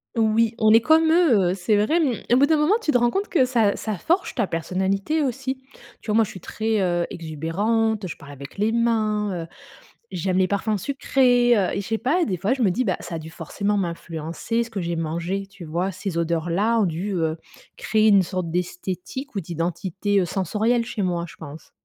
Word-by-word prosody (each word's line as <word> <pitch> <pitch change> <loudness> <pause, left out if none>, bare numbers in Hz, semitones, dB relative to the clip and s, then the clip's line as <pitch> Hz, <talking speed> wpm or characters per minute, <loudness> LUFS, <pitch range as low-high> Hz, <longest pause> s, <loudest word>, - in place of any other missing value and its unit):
Oui, 225 0 +2
on 215 0 +4
est 225 - +7
comme 320 +3 +4
eux, 240 - +4
heu, - - 0
c'est 195 +3 +1
vrai, 305 +12 +2
mmh. 265 -8 0
Au - - +6
bout 280 +2 +5
d'un 315 -1 +3
moment, 300 +7 +3
tu 300 - +1
te 245 - +4
rends 240 0 +2
compte 400 +2 -1
que 270 -8 +3
ça 230 -5 +2
ça 215 -4 -4
forge 345 +2 0
ta 195 - 0
personnalité 190 - -1
aussi, 265 0 -2 0.4
tu - - -16
vois, 210 - +2
moi, 225 - +5
je - - -5
suis 185 - -9
très, 220 +3 -1
heu, 175 -1 +1
exubérante, 195 +7 -1
je - - -7
parle 140 0 -12
avec 140 +5 -11
les 215 +2 +1
mains, 215 -6 0
heu, - - -10 0.6
j'aime 185 +1 -1
les 185 -1 +3
parfums 205 +1 0
sucrés, 245 -1 +3
heu 190 - 0
et - - 0
je - - -10
sais 225 -1 -1
pas, 320 +9 +1
des 185 -5 -2
fois, 205 +9 +1
je 260 - -3
me 195 - +4
dis, 250 +7 0
bah, 185 - 0
ça 165 - -6
a - - -3
dû 160 0 -9
forcément 200 +6 -2
m'influencer 170 +4 -3
ce 235 - -7
que 200 -4 -4
j'ai 170 -1 -2
mangé, 170 +5 -3
tu 195 -3 -12
vois? 175 +5 -2
Ces 185 -1 -5
odeurs-là 170 +7 +1
ont 200 - +3
dû, 175 +5 -3
heu, 160 -1 0 0.4
créer 215 +1 +2
une 200 -2 +6
sorte 180 -2 -3
d'esthétique 180 - -4
ou 195 - -1
d'identité, 180 +4 -1
heu, - - +1
sensorielle 210 +7 0
chez 220 -4 -3
moi, 175 -2 -1
je - - -13
pense. 155 0 -11
200 Hz, 225 wpm, -23 LUFS, 175-230 Hz, 0.6 s, est